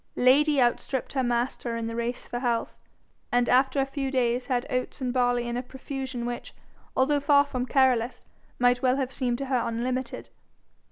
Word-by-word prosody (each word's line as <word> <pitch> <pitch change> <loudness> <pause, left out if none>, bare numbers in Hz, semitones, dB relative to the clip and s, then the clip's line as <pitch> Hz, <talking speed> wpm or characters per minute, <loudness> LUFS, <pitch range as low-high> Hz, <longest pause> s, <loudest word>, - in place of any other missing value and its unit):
Lady 280 +3 +4
outstripped 250 +1 0
her 270 - +1
master 240 -1 -1
in 230 - -3
the 230 0 -4
race 235 +1 -3
for 240 - -4
health, 240 -2 -1 0.6
and 245 0 +2
after 265 +2 +3
a 270 - +3
few 275 0 -3
days 250 -1 0
had 250 -2 0
oats 255 +3 -3
and 250 -2 -2
barley 245 -1 +1
in 240 - -3
a 245 - -1
profusion 260 -1 -6
which, 240 0 -5 0.4
although 285 +3 +3
far 285 0 +4
from 255 -3 -3
careless, 255 -3 +2 0.3
might 245 0 +3
well 255 -1 +3
have 265 -2 -2
seemed 250 -3 -1
to 275 - -4
her 260 -2 +1
unlimited. 250 +3 -3
255 Hz, 180 wpm, -27 LUFS, 240-265 Hz, 0.6 s, Lady